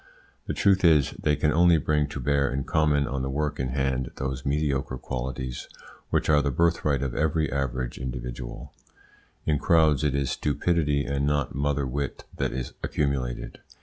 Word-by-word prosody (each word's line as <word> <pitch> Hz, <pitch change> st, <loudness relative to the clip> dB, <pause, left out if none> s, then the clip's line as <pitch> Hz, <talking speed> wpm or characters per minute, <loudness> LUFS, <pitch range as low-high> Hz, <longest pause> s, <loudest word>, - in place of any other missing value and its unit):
The -, -, -2 dB
truth 95 Hz, -1 st, +3 dB
is, 80 Hz, -5 st, +5 dB
they 75 Hz, -1 st, 0 dB
can 75 Hz, 0 st, +1 dB
only 85 Hz, +1 st, +5 dB
bring 75 Hz, 0 st, +1 dB
to 70 Hz, -, -6 dB
bear 70 Hz, +1 st, +1 dB
in 70 Hz, +1 st, -1 dB
common 75 Hz, -2 st, +2 dB
on 65 Hz, +1 st, -2 dB
the 65 Hz, -, -2 dB
work 75 Hz, +2 st, -2 dB
in 65 Hz, -, 0 dB
hand 65 Hz, -1 st, -1 dB
those 65 Hz, -1 st, -4 dB
mediocre 70 Hz, -3 st, 0 dB
qualities 65 Hz, -1 st, -5 dB, 0.4 s
which -, -, +1 dB
are 75 Hz, -1 st, +5 dB
the 70 Hz, -, 0 dB
birthright 75 Hz, -2 st, +1 dB
of 65 Hz, -3 st, -2 dB
every 80 Hz, 0 st, 0 dB
average 65 Hz, -2 st, -2 dB
individual. 60 Hz, -1 st, -6 dB, 0.7 s
In 75 Hz, -2 st, +1 dB
crowds 80 Hz, -3 st, +4 dB
it 75 Hz, -2 st, +1 dB
is 70 Hz, -2 st, 0 dB
stupidity 75 Hz, -1 st, 0 dB
and 70 Hz, 0 st, 0 dB
not 75 Hz, -3 st, 0 dB
mother 70 Hz, 0 st, 0 dB
wit 70 Hz, +2 st, -4 dB
that -, -, 0 dB
is 65 Hz, -2 st, -4 dB
accumulated. 65 Hz, -4 st, -2 dB
70 Hz, 170 wpm, -26 LUFS, 65-75 Hz, 0.7 s, is